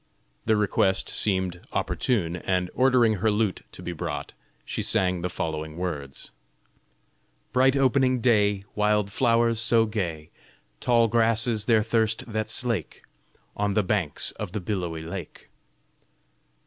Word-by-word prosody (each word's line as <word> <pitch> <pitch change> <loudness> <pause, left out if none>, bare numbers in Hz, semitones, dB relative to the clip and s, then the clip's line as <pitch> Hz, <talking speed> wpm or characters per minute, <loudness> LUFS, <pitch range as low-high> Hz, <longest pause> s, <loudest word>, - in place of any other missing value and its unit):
The 110 - +4
request 95 -2 +1
seemed 95 -3 +1
opportune, 90 -9 -1
and 90 -1 -1
ordering 125 -4 +3
her 110 +4 +1
lute 105 -2 0
to - - -10
be 90 - -4
brought, 75 -3 -5 0.3
she - - -3
sang 90 -1 +1
the 90 - -2
following 80 -2 -4
words: 75 -7 -5 1.2
Bright 130 +1 +4
opening 130 -1 +2
day, 105 -5 +2
Wild 105 -1 +1
flowers 115 -1 +2
so 115 -1 +3
gay, 85 -8 -4 0.5
Tall 120 -2 +3
grasses 115 -1 +2
their 110 -1 +3
thirst 110 0 0
that 110 -1 -3
slake, 115 - -2 0.5
On 100 -1 -1
the 105 - +3
banks 90 -6 -1
of 100 -4 -5
the 105 - -2
billowy 85 -4 -3
lake! 85 0 -8
105 Hz, 130 wpm, -25 LUFS, 90-115 Hz, 1.2 s, The